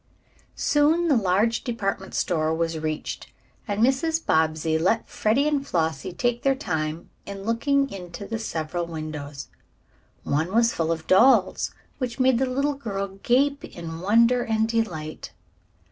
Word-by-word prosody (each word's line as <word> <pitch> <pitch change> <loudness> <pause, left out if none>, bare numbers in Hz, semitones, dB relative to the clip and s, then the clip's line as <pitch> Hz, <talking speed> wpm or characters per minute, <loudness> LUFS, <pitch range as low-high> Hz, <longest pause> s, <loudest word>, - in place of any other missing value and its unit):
Soon 315 +4 +2
the 285 - +5
large 215 +2 +2
department 195 -6 -3
store 160 -2 0
was 165 -1 -1
reached 155 -1 -4 0.4
and 205 +1 0
Mrs. 315 +6 +1
Bobbsey 160 0 +1
let 190 +7 +1
Freddie 240 +7 +1
and 290 -2 +1
Flossie 160 -4 -1
take 240 +6 -1
their 270 -1 +2
time 160 - -3 0.2
in 195 -1 -7
looking 275 +6 +1
into 180 +1 -8
the 225 +3 -4
several 170 -4 -3
windows. 150 -4 -6 0.7
One 155 +5 0
was 230 0 +4
full 165 0 -1
of 160 -1 -3
dolls, 220 0 +4 0.3
which 250 -1 -3
made 255 -2 +4
the 265 - +1
little 275 +3 0
girl 200 -7 -5
gape 280 +3 +2
in 165 -1 -7
wonder 230 +5 +4
and 220 0 +1
delight. 180 -10 -3
205 Hz, 145 wpm, -25 LUFS, 165-250 Hz, 0.7 s, the